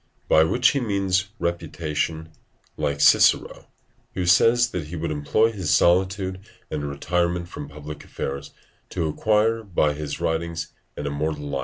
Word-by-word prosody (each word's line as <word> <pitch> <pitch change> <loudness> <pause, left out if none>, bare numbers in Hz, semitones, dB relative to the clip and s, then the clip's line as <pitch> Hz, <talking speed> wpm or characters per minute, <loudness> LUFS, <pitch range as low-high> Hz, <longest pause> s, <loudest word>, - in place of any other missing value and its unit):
By 80 - +6
which 125 +9 +3
he 140 - 0
means 100 -5 0
reputation; 80 -2 -3 0.5
like 70 0 -2
Cicero, - - +4 0.5
who 90 - -1
says 115 +7 +4
that 85 -5 -4
he 85 - -7
would 85 0 -3
employ 75 +10 +2
his 95 -7 -2
solitude 95 +1 +2 0.3
and 75 -2 -3
retirement 85 +4 -1
from 75 -4 -8
public 75 0 -9
affairs 70 0 -5 0.4
to 85 -3 -2
acquire 110 +7 +1
by 85 -8 +1
his 75 -1 -5
writings 80 0 -2 0.2
an 75 - -4
immortal 75 +1 -2
life. 70 -1 -2
85 Hz, 145 wpm, -24 LUFS, 75-95 Hz, 0.5 s, By